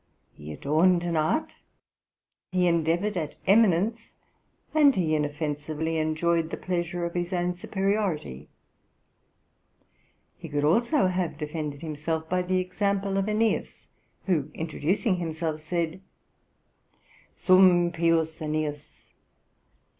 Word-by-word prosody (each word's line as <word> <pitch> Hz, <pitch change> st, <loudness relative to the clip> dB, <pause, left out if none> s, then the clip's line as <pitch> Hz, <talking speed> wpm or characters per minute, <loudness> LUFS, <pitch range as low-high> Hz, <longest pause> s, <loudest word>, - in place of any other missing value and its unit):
He 75 Hz, +1 st, -10 dB
adorned 165 Hz, -, +2 dB
an 170 Hz, -1 st, -1 dB
art, 155 Hz, -, 0 dB, 0.9 s
he 180 Hz, -1 st, +2 dB
endeavoured 170 Hz, +4 st, +1 dB
at 155 Hz, -3 st, -3 dB
eminence, 215 Hz, +2 st, +3 dB, 0.6 s
and 290 Hz, -4 st, +5 dB
he 165 Hz, -4 st, +1 dB
inoffensively 150 Hz, +1 st, -2 dB
enjoyed 160 Hz, +1 st, 0 dB
the -, -, -5 dB
pleasure 175 Hz, -1 st, -2 dB
of 170 Hz, -, -4 dB
his 175 Hz, 0 st, -2 dB
own 180 Hz, -1 st, 0 dB
superiority. 190 Hz, -, -2 dB, 1.9 s
He 165 Hz, -, -8 dB
could 145 Hz, -1 st, -1 dB
also 235 Hz, -, +3 dB
have 180 Hz, -4 st, -1 dB
defended 150 Hz, -1 st, -5 dB
himself 160 Hz, +1 st, -3 dB
by 180 Hz, +2 st, 0 dB
the 185 Hz, +1 st, 0 dB
example 195 Hz, +1 st, -1 dB
of 195 Hz, +1 st, 0 dB
Aeneas, 220 Hz, +1 st, -1 dB, 0.4 s
who, 155 Hz, -7 st, 0 dB
introducing 170 Hz, -, -1 dB
himself, 160 Hz, -2 st, -3 dB
said: 170 Hz, +2 st, -2 dB, 1.3 s
'Sum 185 Hz, -2 st, +5 dB
pius 165 Hz, -1 st, +1 dB
Aeneas........ 150 Hz, -1 st, -4 dB
170 Hz, 110 wpm, -26 LUFS, 155-185 Hz, 1.9 s, and